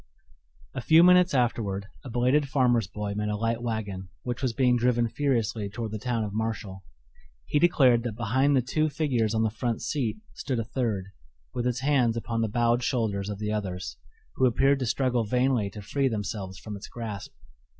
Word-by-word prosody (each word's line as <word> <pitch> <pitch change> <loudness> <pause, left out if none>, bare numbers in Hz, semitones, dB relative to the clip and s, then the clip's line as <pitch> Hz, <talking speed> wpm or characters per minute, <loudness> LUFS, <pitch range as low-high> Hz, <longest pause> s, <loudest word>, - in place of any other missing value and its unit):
A 130 - -4
few 160 +7 +6
minutes 180 0 +6
afterward 110 -5 0 0.2
a 135 - -8
belated 125 +4 +2
farmer's 125 -6 +2
boy 105 +1 -4
met 105 +1 -2
a 105 - -1
light 115 +2 -1
wagon 105 -5 -4
which 125 0 -4
was 130 -3 +1
being 125 0 +3
driven 120 -1 +2
furiously 115 -6 -1
toward 110 +1 -5
the 110 - -4
town 115 0 -1
of 105 -1 -4
Marshall. 105 -3 -3 0.6
He 145 - +1
declared 135 -8 +4
that 115 -3 -4
behind 130 +5 +2
the 130 - +3
two 155 +5 0
figures 125 -7 0
on 110 - +2
the 110 - +1
front 115 0 -2
seat 135 - -1 0.2
stood 130 -3 -3
a 115 - 0
third, 110 -5 -2 0.5
with 120 0 -1
its 125 +1 -1
hands 130 -5 +2
upon 115 0 -2
the 110 - 0
bowed 120 +2 +2
shoulders 110 -6 -1
of 105 - -4
the 105 +1 -3
others, 90 - -4 0.4
who 130 - +4
appeared 135 +3 +3
to 130 - -2
struggle 125 -1 +1
vainly 125 -1 +1
to 105 0 -9
free 135 +6 0
themselves 105 -4 -4
from 105 +3 -7
its 100 - -8
grasp. 110 -4 -6
115 Hz, 190 wpm, -27 LUFS, 105-130 Hz, 0.6 s, few